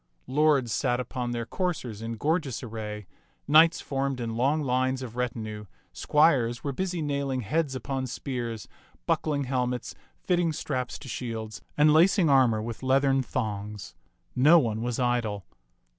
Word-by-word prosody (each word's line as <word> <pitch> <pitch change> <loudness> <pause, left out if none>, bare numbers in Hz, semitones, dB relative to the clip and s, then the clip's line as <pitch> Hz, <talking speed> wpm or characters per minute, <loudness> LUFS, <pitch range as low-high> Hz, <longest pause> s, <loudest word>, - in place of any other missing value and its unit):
Lords 140 -3 +2
sat 125 +2 0
upon 125 -1 -3
their 120 -1 -3
coursers 155 - -3
in 115 +1 -4
gorgeous 145 +1 -1
array, 105 -3 -6 0.4
knights 160 +3 +6
formed 135 -1 -2
in 115 -2 -3
long 140 +6 +1
lines 130 0 0
of 120 -2 -8
retinue, 110 -4 -4 0.3
squires 130 -6 +2
were 140 - -1
busy 175 +3 -2
nailing 140 -3 -1
heads 140 +5 -1
upon 130 0 -3
spears, 120 -3 -5 0.4
buckling 145 -2 0
hel 125 -1 0
mets, 125 -1 -4 0.2
fitting 175 -3 0
straps 130 -4 -3
to - - -12
shields, 110 -3 -5 0.2
and 150 0 +5
lacing 170 0 +5
armor 120 -5 +4
with 115 0 -6
leathern 135 +1 +3
thongs; 105 -4 -4 0.4
no 150 +7 +7
one 115 -7 0
was 120 0 -2
idle. 120 -6 -1
130 Hz, 145 wpm, -27 LUFS, 115-145 Hz, 0.4 s, no